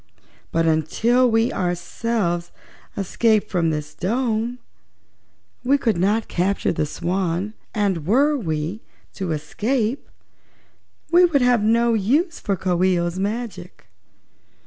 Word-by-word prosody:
But 165 0 +1
until 220 +11 +2
we 225 +2 +2
ourselves 175 0 -2 0.5
escape 215 +2 +1
from 170 -4 +1
this 150 -1 -4
dome 230 +3 -1 1.1
we 270 +3 +3
could 230 -6 +1
not 210 +5 +1
capture 190 +3 0
the 155 - -1
Swan, 180 +4 -2 0.2
and 190 -7 0
were 280 +8 +3
we 165 - -3 0.3
to 190 -4 -4
escape 220 - -2 1.0
we 350 +1 +6
would 290 -7 +2
have 245 -3 +4
no 230 +2 +3
use 285 - +1
for 200 - -1
Coo 180 -1 0
ee 185 -1 +3
oh's 175 +1 -2
magic." 220 +3 -5
205 Hz, 120 wpm, -22 LUFS, 175-235 Hz, 1.1 s, we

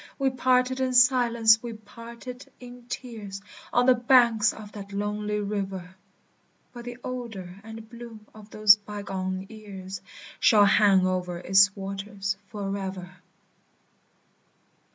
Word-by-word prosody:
We 270 -1 +1
parted 255 0 +1
in 260 -1 0
silence, 235 -3 +5
we 235 -1 -6
parted 235 +4 -11
in 245 -1 -12
tears, 215 -7 -6 0.3
On 245 - +3
the 255 - +7
banks 240 -3 +4
of 210 -1 -11
that 200 -1 -9
lonely 210 +1 -2
river: 195 -3 -4 0.8
But 240 -1 -10
the 245 0 -7
odor 210 -7 -7
and 220 0 -10
bloom 230 -2 -11
of 215 -1 -14
those 215 -1 +6
bygone 195 -2 -5
years 195 -3 -9 0.4
Shall 210 -2 +6
hang 195 -2 +4
o'er 180 -1 -2
its 195 +3 +4
waters 195 0 -4
forever. 195 -3 -5
210 Hz, 120 wpm, -26 LUFS, 195-240 Hz, 0.8 s, the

